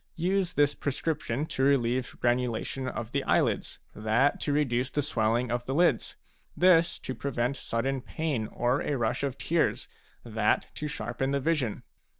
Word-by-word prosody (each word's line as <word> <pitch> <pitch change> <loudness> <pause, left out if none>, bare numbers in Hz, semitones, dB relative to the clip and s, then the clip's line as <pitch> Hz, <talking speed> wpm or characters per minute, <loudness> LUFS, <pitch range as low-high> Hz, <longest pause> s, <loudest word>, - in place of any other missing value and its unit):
Use 185 +1 0
this 145 0 +3
prescription 145 -2 -2
to 135 - -4
relieve 130 -2 +1
granu 125 +1 +2
lation 130 +3 -3
of 115 -1 -5
the 140 0 0
eyelids, - - +1 0.2
that 110 +7 +2
to 145 - -1
reduce 130 -3 +1
the 145 - -1
swelling 120 -3 +1
of 120 0 -2
the 135 - -1
lids, 165 -7 +2 0.4
this 175 -2 +5
to 130 - -5
prevent 130 -1 -1
sudden 135 +2 -2
pain 140 -7 -2
or 120 +5 0
a 145 - -1
rush 120 +1 0
of 140 -2 -2
tears, 165 0 0 0.4
that 110 -2 0
to 150 - -4
sharpen 125 -1 -3
the 140 0 +1
vision. 140 -6 -1
135 Hz, 160 wpm, -28 LUFS, 120-145 Hz, 0.4 s, this